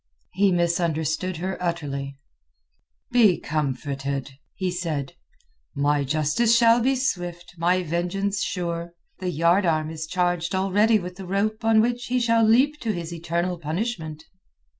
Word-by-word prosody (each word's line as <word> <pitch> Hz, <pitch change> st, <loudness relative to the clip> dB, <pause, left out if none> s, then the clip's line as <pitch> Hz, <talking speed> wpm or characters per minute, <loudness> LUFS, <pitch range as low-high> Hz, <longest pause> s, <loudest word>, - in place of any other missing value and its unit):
He 195 Hz, +1 st, +3 dB
misunderstood 170 Hz, 0 st, 0 dB
her 185 Hz, +3 st, -4 dB
utterly. 140 Hz, -6 st, -3 dB, 0.9 s
"Be 220 Hz, -7 st, +5 dB
comforted," 140 Hz, -2 st, -3 dB, 0.2 s
he 185 Hz, -2 st, -2 dB
said. 160 Hz, -6 st, -3 dB, 0.6 s
"My 145 Hz, 0 st, +2 dB
justice 155 Hz, -, +2 dB
shall 230 Hz, 0 st, +5 dB
be 265 Hz, +3 st, +2 dB
swift; 175 Hz, -9 st, -3 dB
my 180 Hz, +2 st, +2 dB
vengeance 180 Hz, +5 st, -1 dB
sure. 170 Hz, -1 st, -3 dB, 0.2 s
The 185 Hz, -, -2 dB
yard 170 Hz, +4 st, +3 dB
arm 155 Hz, -1 st, 0 dB
is 160 Hz, 0 st, -5 dB
charged 175 Hz, 0 st, 0 dB
already 205 Hz, +4 st, +3 dB
with 180 Hz, -2 st, -7 dB
the 190 Hz, -2 st, -8 dB
rope 215 Hz, +4 st, -1 dB
on 225 Hz, -1 st, +5 dB
which 240 Hz, +1 st, -1 dB
he 250 Hz, +1 st, +1 dB
shall 230 Hz, -1 st, +3 dB
leap 260 Hz, +7 st, +4 dB
to 225 Hz, -, -1 dB
his 170 Hz, -2 st, -5 dB
eternal 170 Hz, +1 st, -2 dB
punishment." 160 Hz, -2 st, -4 dB
175 Hz, 140 wpm, -24 LUFS, 160-205 Hz, 0.9 s, Be